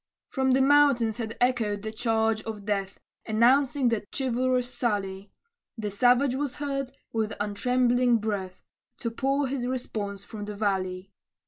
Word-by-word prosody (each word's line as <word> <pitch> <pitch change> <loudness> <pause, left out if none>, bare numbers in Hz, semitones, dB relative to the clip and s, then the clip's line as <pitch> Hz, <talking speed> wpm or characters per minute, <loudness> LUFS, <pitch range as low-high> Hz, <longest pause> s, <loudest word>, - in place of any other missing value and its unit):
From 265 -1 +1
the 265 +1 +4
mountains 275 -6 +4
had 225 -1 -4
echoed 225 -5 +1
the 220 - -4
charge 220 -1 0
of 215 -3 -7
death, 200 -2 -2 0.3
Announcing 250 +4 +3
that 215 -3 -2
chivalrous 255 -1 0
sally; 200 -4 -2 0.5
The 210 -2 -3
savage 245 +5 +3
was 275 -1 -2
heard, 275 -2 -3 0.2
with 220 -1 -1
untrembling 245 +3 +2
breath, 200 -4 -4 0.4
To 230 - -2
pour 275 +4 0
his 255 -2 -2
response 210 -6 -4
from 210 -1 -7
the 210 0 -6
valley. 190 -2 -2
230 Hz, 140 wpm, -27 LUFS, 205-255 Hz, 0.5 s, the